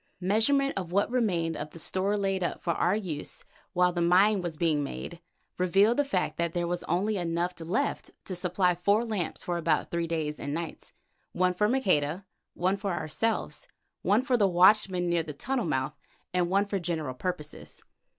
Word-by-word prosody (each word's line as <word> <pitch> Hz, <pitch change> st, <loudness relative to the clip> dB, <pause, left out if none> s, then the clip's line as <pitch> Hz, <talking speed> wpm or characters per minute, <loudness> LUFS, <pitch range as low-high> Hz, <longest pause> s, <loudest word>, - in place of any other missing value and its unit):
Measurement 225 Hz, +9 st, +2 dB
of 180 Hz, -3 st, -4 dB
what 200 Hz, +5 st, +1 dB
remained 175 Hz, -10 st, +1 dB
of -, -, -5 dB
the 165 Hz, -, -13 dB
store 190 Hz, +5 st, 0 dB
laid 195 Hz, -2 st, 0 dB
up 175 Hz, -, -3 dB
for 170 Hz, -, +1 dB
our 180 Hz, +4 st, +2 dB
use 175 Hz, -9 st, -4 dB, 0.3 s
while 180 Hz, 0 st, +3 dB
the 175 Hz, -, -1 dB
mine 190 Hz, +4 st, +4 dB
was 170 Hz, -3 st, -5 dB
being 160 Hz, -3 st, +1 dB
made, 170 Hz, +4 st, -6 dB, 0.4 s
revealed 195 Hz, +5 st, +4 dB
the 290 Hz, -, +4 dB
fact 190 Hz, -10 st, -1 dB
that 170 Hz, 0 st, -1 dB
there 175 Hz, 0 st, 0 dB
was 175 Hz, +1 st, -2 dB
only 200 Hz, +5 st, 0 dB
enough 175 Hz, 0 st, -1 dB
left 185 Hz, -, -1 dB, 0.2 s
to 190 Hz, -, -5 dB
supply 180 Hz, 0 st, +1 dB
four 200 Hz, +6 st, +2 dB
lamps 210 Hz, -7 st, -3 dB
for 175 Hz, -1 st, -2 dB
about 165 Hz, -, 0 dB
three 170 Hz, -1 st, -1 dB
days 155 Hz, -2 st, -2 dB
and 145 Hz, +1 st, -3 dB
nights: 165 Hz, -1 st, -6 dB, 0.4 s
one 180 Hz, 0 st, +2 dB
for 210 Hz, +3 st, +1 dB
Maqueda, 185 Hz, -, +1 dB, 0.3 s
one 185 Hz, +3 st, +1 dB
for 200 Hz, -1 st, -2 dB
ourselves, 225 Hz, -, -2 dB, 0.3 s
one 210 Hz, +5 st, +3 dB
for 260 Hz, -2 st, +2 dB
the 205 Hz, -3 st, +4 dB
watchman 185 Hz, 0 st, +4 dB
near 170 Hz, -1 st, +2 dB
the 155 Hz, -2 st, -7 dB
tunnel 245 Hz, -, -2 dB
mouth, 135 Hz, -2 st, -1 dB, 0.4 s
and 180 Hz, -1 st, +1 dB
one 200 Hz, +2 st, +3 dB
for 200 Hz, -1 st, -2 dB
general 160 Hz, -6 st, -2 dB
purposes. 150 Hz, +1 st, -6 dB
180 Hz, 185 wpm, -28 LUFS, 170-200 Hz, 0.4 s, mine